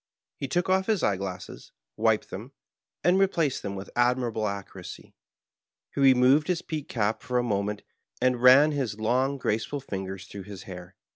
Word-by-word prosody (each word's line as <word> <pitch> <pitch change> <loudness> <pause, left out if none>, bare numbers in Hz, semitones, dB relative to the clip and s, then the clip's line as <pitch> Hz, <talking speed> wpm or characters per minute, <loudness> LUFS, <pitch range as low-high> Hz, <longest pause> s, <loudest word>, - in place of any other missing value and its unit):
He 140 - -4
took 175 +6 0
off 190 0 +2
his 215 -6 +1
eye 100 - +3
glasses, 95 -1 -7 0.2
wiped - - +1
them, - - -8 0.5
and 180 +4 +4
replaced 170 -8 +1
them 100 -1 -4
with 95 0 -8
admirable 120 -3 +1
accuracy. 100 -2 -8 0.8
He 140 - -2
removed 135 +3 +5
his 180 -2 -1
peaked 155 -3 -5
cap 110 -2 -1
for 125 - -2
a 120 - +2
moment, 105 -2 -2 0.4
and 125 -1 +1
ran 135 +4 +7
his 125 -8 -2
long, 130 +5 +1
grace 110 -4 -1
ful 145 - -4
fingers 95 -6 -6
through 100 -2 -9
his 100 -2 -9
hair. 90 0 -10
125 Hz, 170 wpm, -27 LUFS, 100-140 Hz, 0.8 s, ran